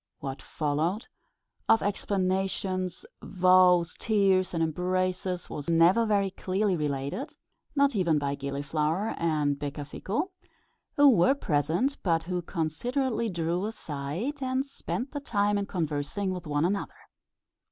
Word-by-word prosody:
What 135 Hz, -1 st, -6 dB
followed 160 Hz, +8 st, -2 dB, 0.6 s
of 225 Hz, -, +5 dB
explanations, 190 Hz, -, -1 dB, 0.2 s
vows, 180 Hz, -2 st, +4 dB
tears, 195 Hz, -4 st, +2 dB
and 165 Hz, -2 st, 0 dB
embraces 180 Hz, +2 st, -1 dB
was 145 Hz, +2 st, -6 dB
never 175 Hz, +7 st, +5 dB
very 200 Hz, -2 st, +2 dB
clearly 190 Hz, +1 st, 0 dB
related, 145 Hz, -, -3 dB, 0.4 s
not 280 Hz, -3 st, +3 dB
even 170 Hz, -6 st, +2 dB
by 140 Hz, -1 st, -1 dB
Gilliflower 150 Hz, +7 st, -1 dB
and 150 Hz, -4 st, 0 dB
Becafico, 150 Hz, -, -3 dB, 0.7 s
who 285 Hz, 0 st, +7 dB
were 245 Hz, +1 st, +5 dB
present, 175 Hz, -, 0 dB
but 165 Hz, -3 st, +1 dB
who 180 Hz, +1 st, -2 dB
considerately 230 Hz, -, -1 dB
drew 175 Hz, +2 st, -1 dB
aside, 180 Hz, -, -4 dB
and 260 Hz, +1 st, 0 dB
spent 275 Hz, -1 st, -5 dB
the 290 Hz, -, -4 dB
time 205 Hz, -6 st, +1 dB
in 200 Hz, -, -3 dB
conversing 165 Hz, +3 st, -2 dB
with 180 Hz, -3 st, -7 dB
one 145 Hz, +1 st, +1 dB
another. 200 Hz, -, -2 dB
185 Hz, 120 wpm, -28 LUFS, 155-210 Hz, 0.7 s, who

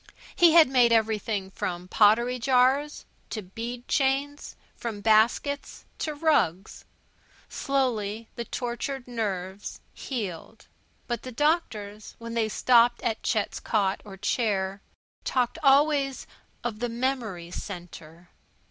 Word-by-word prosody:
He 340 Hz, -2 st, +6 dB
had 330 Hz, -2 st, +8 dB
made 250 Hz, -3 st, +4 dB
everything 215 Hz, -3 st, 0 dB
from 180 Hz, -2 st, -4 dB
pottery 235 Hz, +6 st, +3 dB
jars 265 Hz, +4 st, +2 dB, 0.2 s
to 215 Hz, -, -4 dB
bead 235 Hz, +6 st, -7 dB
chains; 280 Hz, +1 st, 0 dB, 0.2 s
from 225 Hz, -3 st, -5 dB
baskets 225 Hz, +7 st, +1 dB
to 305 Hz, -1 st, -3 dB
rugs. 290 Hz, -, 0 dB, 0.6 s
Slowly 230 Hz, -6 st, -1 dB
the 235 Hz, -, -3 dB
tortured 245 Hz, +3 st, -4 dB
nerves 200 Hz, -4 st, -4 dB
healed. 205 Hz, -, -6 dB, 0.4 s
But 240 Hz, -1 st, -3 dB
the 255 Hz, -, -8 dB
doctors, 225 Hz, -8 st, -1 dB
when 230 Hz, 0 st, -7 dB
they 225 Hz, -2 st, 0 dB
stopped 240 Hz, +1 st, +4 dB
at 225 Hz, -1 st, -1 dB
Chet's 215 Hz, -3 st, -1 dB
cot 200 Hz, -3 st, 0 dB
or 195 Hz, -2 st, -11 dB
chair, 200 Hz, -2 st, -1 dB, 0.4 s
talked 250 Hz, +4 st, 0 dB
always 275 Hz, -1 st, +3 dB, 0.4 s
of 225 Hz, -3 st, -3 dB
"the 245 Hz, +1 st, -1 dB
memory 230 Hz, -8 st, -3 dB
centre." 175 Hz, -2 st, -9 dB
230 Hz, 115 wpm, -26 LUFS, 205-265 Hz, 0.6 s, had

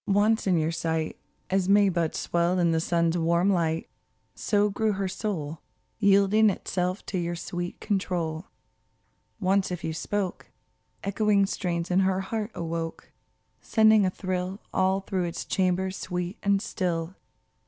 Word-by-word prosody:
Once 205 Hz, +2 st, +2 dB
in 180 Hz, -2 st, +3 dB
your 160 Hz, 0 st, +1 dB
sight, 160 Hz, -1 st, -2 dB, 0.4 s
As 190 Hz, -1 st, +1 dB
May 200 Hz, 0 st, +6 dB
buds 170 Hz, -4 st, 0 dB
swell 175 Hz, +1 st, +1 dB
in 170 Hz, -2 st, +3 dB
the 160 Hz, -, +2 dB
sun's 170 Hz, 0 st, +1 dB
warm 170 Hz, +4 st, +3 dB
light, 165 Hz, -3 st, 0 dB, 0.5 s
So 205 Hz, -1 st, +1 dB
grew 215 Hz, +1 st, +1 dB
her 195 Hz, 0 st, -2 dB
soul, 170 Hz, -6 st, -4 dB, 0.4 s
Yielding 200 Hz, +1 st, +5 dB
itself 185 Hz, 0 st, -2 dB
to 185 Hz, -, -2 dB
your 175 Hz, 0 st, -2 dB
sweet 175 Hz, +1 st, -5 dB
control. 180 Hz, -5 st, -2 dB, 0.9 s
Once 195 Hz, 0 st, +2 dB
if 180 Hz, -1 st, -5 dB
you 160 Hz, -, -2 dB
spoke, 195 Hz, +3 st, -3 dB, 0.6 s
Echoing 200 Hz, 0 st, +2 dB
strains 175 Hz, -2 st, -2 dB
in 180 Hz, -, +4 dB
her 190 Hz, 0 st, +2 dB
heart 215 Hz, +2 st, -3 dB
awoke, 165 Hz, -1 st, -4 dB, 0.5 s
Sending 220 Hz, -2 st, +5 dB
a 185 Hz, -, +3 dB
thrill 185 Hz, +1 st, -3 dB
All 190 Hz, +1 st, +2 dB
through 190 Hz, -2 st, -2 dB
its 170 Hz, -, -4 dB
chambers 190 Hz, 0 st, 0 dB
sweet 180 Hz, +1 st, -4 dB
and 200 Hz, -1 st, +2 dB
still. 170 Hz, -2 st, -2 dB
185 Hz, 145 wpm, -27 LUFS, 170-200 Hz, 0.9 s, May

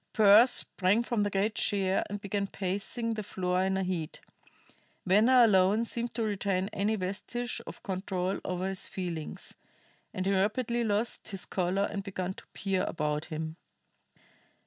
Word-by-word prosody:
Pearse 215 Hz, +3 st, +7 dB
sprang 200 Hz, -1 st, +2 dB
from 235 Hz, -2 st, -1 dB
the 205 Hz, -, +1 dB
great 200 Hz, +2 st, 0 dB
chair 195 Hz, -3 st, +1 dB
and 205 Hz, 0 st, -4 dB
began 200 Hz, 0 st, -2 dB
pacing 205 Hz, +5 st, -2 dB
the 215 Hz, -, -3 dB
floor 180 Hz, -2 st, -1 dB
in 190 Hz, 0 st, +1 dB
a 190 Hz, -, 0 dB
heat. 175 Hz, -4 st, -3 dB, 0.9 s
Venner 225 Hz, +7 st, +6 dB
alone 205 Hz, +1 st, +4 dB
seemed 235 Hz, +1 st, -4 dB
to 230 Hz, -, 0 dB
retain 200 Hz, -2 st, -1 dB
any 205 Hz, +3 st, +1 dB
vestige 225 Hz, +6 st, -4 dB
of -, -, -9 dB
control 190 Hz, -2 st, -2 dB
over 180 Hz, +1 st, -2 dB
his 195 Hz, -1 st, -2 dB
feelings; 170 Hz, -5 st, -5 dB, 0.6 s
and 185 Hz, -, -3 dB
he 195 Hz, -, +2 dB
rapidly 235 Hz, +5 st, +1 dB
lost 220 Hz, +1 st, -1 dB
his 195 Hz, -4 st, -5 dB
color 185 Hz, +2 st, 0 dB
and 200 Hz, 0 st, -2 dB
began 190 Hz, -2 st, -4 dB
to -, -, -14 dB
peer 195 Hz, -1 st, -1 dB
about 150 Hz, -1 st, -2 dB
him. 160 Hz, +1 st, -5 dB
195 Hz, 155 wpm, -30 LUFS, 185-215 Hz, 0.9 s, Pearse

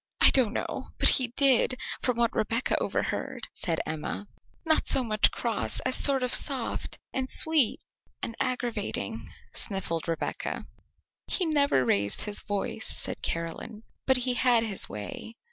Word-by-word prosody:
I -, -, +7 dB
don't 250 Hz, -6 st, +2 dB
know -, -, -4 dB
but -, -, +8 dB
he 255 Hz, -, +3 dB
did, 260 Hz, -2 st, +3 dB, 0.2 s
from 250 Hz, -2 st, -1 dB
what 235 Hz, -1 st, +1 dB
Rebecca 230 Hz, +3 st, 0 dB
overheard," -, -, -3 dB
said 165 Hz, -3 st, -2 dB
Emma. 155 Hz, +6 st, -5 dB, 0.4 s
"Not 315 Hz, -1 st, +2 dB
so 270 Hz, -, +3 dB
much 215 Hz, -2 st, +3 dB
cross 230 Hz, -3 st, -3 dB
as 255 Hz, -, 0 dB
sort 270 Hz, -2 st, +4 dB
of 250 Hz, -, 0 dB
soft, 265 Hz, -5 st, +2 dB, 0.2 s
and 260 Hz, -1 st, -2 dB
sweet, 315 Hz, -7 st, +3 dB, 0.4 s
and 230 Hz, -, -3 dB
aggravating," 250 Hz, -2 st, -2 dB, 0.2 s
sniffled 185 Hz, -6 st, -3 dB
Rebecca. 165 Hz, -1 st, -3 dB, 0.6 s
"He 370 Hz, -, +1 dB
never 285 Hz, -, +2 dB
raised 100 Hz, -2 st, 0 dB
his 210 Hz, -1 st, -1 dB
voice," 205 Hz, -1 st, -3 dB
said -, -, -5 dB
Caroline; 165 Hz, +6 st, -4 dB, 0.2 s
"but 265 Hz, -1 st, +4 dB
he 250 Hz, 0 st, -1 dB
had 245 Hz, -2 st, +3 dB
his 210 Hz, -4 st, +4 dB
way." 105 Hz, -, -7 dB
235 Hz, 145 wpm, -27 LUFS, 205-260 Hz, 0.6 s, but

